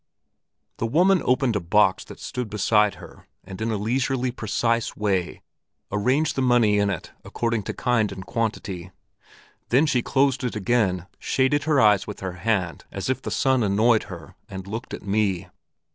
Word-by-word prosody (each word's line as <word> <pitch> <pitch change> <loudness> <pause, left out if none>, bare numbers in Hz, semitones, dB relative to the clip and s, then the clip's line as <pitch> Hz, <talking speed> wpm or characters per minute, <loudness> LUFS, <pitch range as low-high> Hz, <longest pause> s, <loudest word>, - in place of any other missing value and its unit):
The 115 - -1
woman 180 +8 +3
opened 125 -2 +2
a - - +2
box 95 +2 +2
that - - -12
stood 125 -3 -5
beside 105 0 +2
her - - -14 0.2
and 95 +2 -9
in 110 - -1
a 110 - -1
leisurely, 125 +4 0
precise 115 0 -1
way 95 -4 -1 0.5
arranged 130 +10 +1
the 135 - 0
money 120 -5 +3
in 100 0 +2
it 95 -4 -5
according 115 -2 -2
to - - -3
kind 115 -5 +1
and 95 -1 -8
quantity; 95 -4 -3 0.8
then 135 +6 +4
she 130 -5 +1
closed 135 0 +1
it 125 - -2
again, 100 -4 +1
shaded 145 +2 +1
her 155 -3 +3
eyes 105 -4 +4
with 105 - -7
her 95 -2 -4
hand 95 -5 -1
as - - -2
if - - -3
the - - -5
sun 130 -1 +2
annoyed 110 +2 +3
her, 85 -7 -10 0.2
and 95 -1 -7
looked 110 +5 -5
at - - -12
me. 100 -3 0
110 Hz, 175 wpm, -24 LUFS, 100-125 Hz, 0.8 s, then